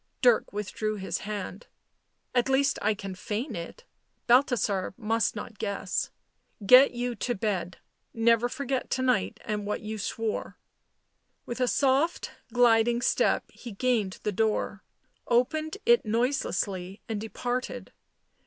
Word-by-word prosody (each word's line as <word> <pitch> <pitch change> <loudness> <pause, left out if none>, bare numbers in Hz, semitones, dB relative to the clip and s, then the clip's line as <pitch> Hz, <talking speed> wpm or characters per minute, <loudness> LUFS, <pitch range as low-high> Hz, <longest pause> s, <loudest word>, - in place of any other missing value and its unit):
Dirk 240 -3 +4
withdrew 210 +1 -3
his 195 -2 -3
hand. 205 0 -5 0.3
" - - -48
At 245 +1 +2
least 275 +1 +2
I 215 +1 +2
can 195 -1 -6
feign 215 +8 -4
it 175 - -7 0.2
— - - -47
Balthasar 235 -7 +2
must 225 -2 0
not 210 +1 -7
guess 200 -3 -2 0.3
— 205 - -16
get 265 +1 +7
you 245 0 -1
to 245 +3 -1
bed 190 -4 -2 0.2
— - - -49
never 230 +1 +3
forget 270 -2 -3
to 260 - 0
night 100 - +1
and 210 -1 -2
what 210 - -2
you 215 0 -5
swore." 220 +2 -3 0.9
With 240 +1 -5
a 250 - +3
soft 280 +6 +1 0.2
gliding 240 0 +4
step - - +2
he 240 -3 -10
gained 215 -4 0
the 210 - 0
door, 210 -1 -1 0.4
opened 310 +8 +1
it 475 +1 +5
noiselessly, 210 -5 -1
and 215 -2 -3
departed. 245 +3 -4
225 Hz, 145 wpm, -28 LUFS, 205-250 Hz, 0.9 s, get